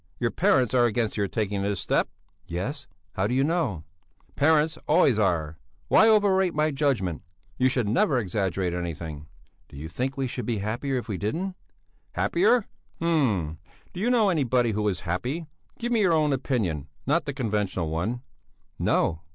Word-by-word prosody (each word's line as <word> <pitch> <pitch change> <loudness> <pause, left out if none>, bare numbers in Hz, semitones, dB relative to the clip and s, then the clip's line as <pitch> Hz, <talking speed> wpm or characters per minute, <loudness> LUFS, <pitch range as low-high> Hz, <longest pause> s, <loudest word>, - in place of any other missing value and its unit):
Your 120 -1 0
parents 130 - +2
are 120 -1 +5
against 115 -1 -1
your 100 -2 0
taking 105 -2 -2
this 100 -1 -1
step?" - - 0 0.4
"Yes! 95 - -4 0.3
How 95 +2 0
do 125 - -1
you 135 - +3
know?" 145 - 0 0.5
"Parents 155 +1 +3
always 150 -8 +4
are. 80 -6 0 0.3
Why 220 - +6
overrate 190 -5 +3
my 155 +1 +2
judgment? 130 - 0 0.4
You 130 - +4
should 125 -4 0
never 125 +5 +2
exaggerate 95 -4 -1
anything." 80 -4 -5 0.4
"Do - - -12
you 75 +3 -6
think 130 - -3
we 135 - 0
should 125 0 -4
be 115 -3 0
happier 120 +7 -2
if 125 - -4
we 100 -5 -3
didn't?" 175 - -2 0.6
"Happier? 250 - +2 0.3
Hm! 110 - +1 0.3
Do 180 - -7
you 225 +5 +1
know 230 -5 +4
anybody 125 -8 +2
who 105 0 -1
is 95 -3 -1
happy? 125 - -3 0.3
Give 240 +1 -3
me 230 -2 +3
your 185 -4 +4
own 155 -2 +3
opinion, 105 - -1 0.2
not 155 +5 +1
the 145 - -2
conventional 105 - -1
one." 110 +10 -2 0.6
"No!" 80 0 +1
120 Hz, 170 wpm, -26 LUFS, 95-155 Hz, 0.6 s, Why